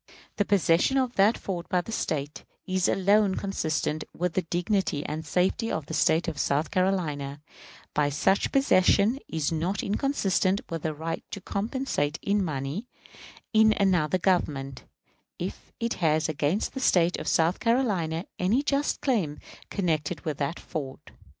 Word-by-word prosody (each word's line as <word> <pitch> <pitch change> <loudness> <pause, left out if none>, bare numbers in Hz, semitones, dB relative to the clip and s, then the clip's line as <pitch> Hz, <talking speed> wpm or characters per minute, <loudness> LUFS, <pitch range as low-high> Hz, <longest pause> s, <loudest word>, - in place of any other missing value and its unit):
The 205 - +2
possession 190 +5 +3
of 255 -2 +1
that 205 +2 +4
fort 175 -3 -5
by 180 - +2
the 225 - -9
State 150 -8 -3 0.2
is 185 0 +1
alone 200 0 +3
consistent 160 -5 -1
with 180 0 -1
the 185 - +1
dignity 175 -2 -1
and 155 +2 -4
safety 190 +7 0
of 160 - -2
the 160 - -7
State 160 +2 +2
of 155 -4 -3
South 145 +3 0
Carolina; 155 -7 -1 0.5
but 145 -1 +1
such 195 +7 +2
possession 225 -2 +4
is 160 0 -1
not 175 +5 -1
inconsistent 200 -5 +1
with 165 -2 -4
a 155 - -2
right 165 +2 -4
to - - -6
compensation 200 - -2
in 205 0 +1
money 150 - -3 0.7
in 220 0 +5
another 185 -4 +3
Government, 145 -8 -1 0.5
if - - -6
it 235 0 -1
has 155 -1 +2
against 155 +6 -1
the 265 - -4
State 175 -8 +3
of - - -6
South 165 +2 +2
Carolina 195 -9 +1
any 215 +10 +2
just 285 0 0
claim 190 - 0 0.3
connected 160 -4 -1
with 155 -3 -3
that 145 +4 -2
fort. 135 -4 -7
180 Hz, 150 wpm, -27 LUFS, 155-205 Hz, 0.7 s, in